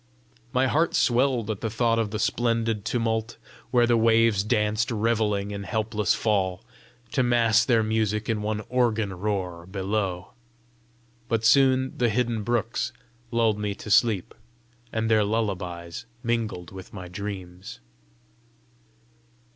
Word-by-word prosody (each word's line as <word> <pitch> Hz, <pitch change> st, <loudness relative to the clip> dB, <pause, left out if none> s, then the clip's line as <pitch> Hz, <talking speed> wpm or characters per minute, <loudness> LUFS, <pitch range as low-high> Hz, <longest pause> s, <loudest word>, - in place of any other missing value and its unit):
My 130 Hz, +1 st, +2 dB
heart 160 Hz, +5 st, +1 dB
swelled 120 Hz, -3 st, +2 dB
at 105 Hz, -, -6 dB
the 110 Hz, -, -1 dB
thought 115 Hz, +1 st, +1 dB
of 110 Hz, -2 st, 0 dB
the 105 Hz, -, -3 dB
splendid 115 Hz, -1 st, 0 dB
tumult, 115 Hz, -1 st, -1 dB, 0.3 s
where 120 Hz, -1 st, +4 dB
the 120 Hz, 0 st, +3 dB
waves 115 Hz, -2 st, +4 dB
danced 105 Hz, +2 st, +1 dB
revelling 105 Hz, -3 st, 0 dB
in 100 Hz, 0 st, -5 dB
helpless 105 Hz, +1 st, 0 dB
fall, 95 Hz, -4 st, 0 dB, 0.5 s
to 130 Hz, -, +1 dB
mass 115 Hz, -2 st, +4 dB
their 115 Hz, -4 st, +3 dB
music 110 Hz, -1 st, 0 dB
in 110 Hz, -2 st, -1 dB
one 105 Hz, 0 st, -2 dB
organ 115 Hz, -5 st, +1 dB
roar 90 Hz, -3 st, -3 dB
below. 95 Hz, -1 st, -2 dB, 1.0 s
But 115 Hz, -1 st, 0 dB
soon 130 Hz, +2 st, +4 dB
the 120 Hz, -1 st, +3 dB
hidden 115 Hz, 0 st, 0 dB
brooks 120 Hz, +2 st, -1 dB, 0.4 s
lulled 115 Hz, -3 st, +1 dB
me 105 Hz, -1 st, -2 dB
to 105 Hz, -, -8 dB
sleep, 105 Hz, -3 st, +3 dB, 0.6 s
and 110 Hz, 0 st, -1 dB
their 110 Hz, -1 st, +4 dB
lullabies 95 Hz, -3 st, -3 dB, 0.2 s
mingled 115 Hz, -7 st, -2 dB
with 95 Hz, -1 st, -11 dB
my 90 Hz, -2 st, -7 dB
dreams. 95 Hz, -1 st, -7 dB
110 Hz, 130 wpm, -25 LUFS, 100-115 Hz, 1.0 s, where